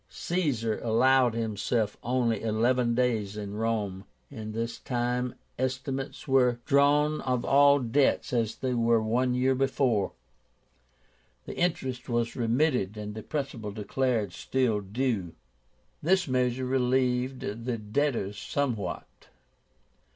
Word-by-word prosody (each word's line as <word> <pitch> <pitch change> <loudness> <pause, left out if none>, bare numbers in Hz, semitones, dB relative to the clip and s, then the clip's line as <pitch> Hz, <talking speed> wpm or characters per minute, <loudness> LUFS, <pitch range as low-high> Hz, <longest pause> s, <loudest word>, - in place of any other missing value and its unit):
Caesar 135 -12 -1
allowed 125 +1 +3
himself 110 0 -1
only 120 -2 0
eleven 120 +2 +1
days 110 -5 0
in 100 -1 -5
Rome. 105 -3 -2 0.3
In 110 -1 -6
this 115 +1 -3
time 125 0 -1 0.2
estimates 130 +2 -3
were 125 -3 +3
drawn 145 +2 +3
of 125 -2 -1
all 140 +1 +6
debts 130 +1 +1
as 115 -3 0
they 130 -1 -2
were 115 -1 +3
one 125 +3 +1
year 130 +1 +2
before, 130 -6 +1 1.3
the - - -7
interest 130 -8 -1
was 120 -1 0
remitted 120 -3 +1
and 105 0 -5
the 110 - -6
principal 135 -6 -4
declared 110 -1 -1
still 125 -3 0
due. 100 -4 -2 0.7
This 180 +2 +2
measure 130 0 0
relieved 125 0 +1 0.2
the 125 -2 -1
debtors 110 -2 -1
somewhat. 115 -11 -2
125 Hz, 115 wpm, -28 LUFS, 110-130 Hz, 1.3 s, all